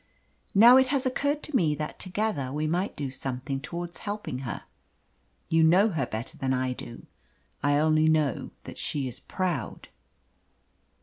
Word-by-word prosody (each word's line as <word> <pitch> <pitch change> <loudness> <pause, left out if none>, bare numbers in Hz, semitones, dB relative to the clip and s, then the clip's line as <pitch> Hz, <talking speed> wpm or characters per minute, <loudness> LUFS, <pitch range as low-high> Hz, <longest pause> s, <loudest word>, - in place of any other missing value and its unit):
Now, 235 +5 +9
it 260 0 +5
has 270 0 0
occurred 285 +3 0
to 300 - -5
me 155 -10 +3
that 150 0 -5
together 185 -8 -2
we 150 +2 -1
might 175 +6 -1
do 140 -3 -4
something 135 +1 -4
towards 175 +3 -6
helping 205 -10 -4
her. 130 -3 -5 0.8
You 165 0 +3
know 185 +7 +5
her 150 - -1
better 110 +3 -6
than 130 -1 0
I 130 0 0
do. 120 -1 -10 0.6
I 145 +1 +3
only 155 +1 +4
know 155 -4 +1
that - - -9
she 140 -3 -2
is 125 - -6
proud." 175 - -3
155 Hz, 160 wpm, -27 LUFS, 135-195 Hz, 0.8 s, Now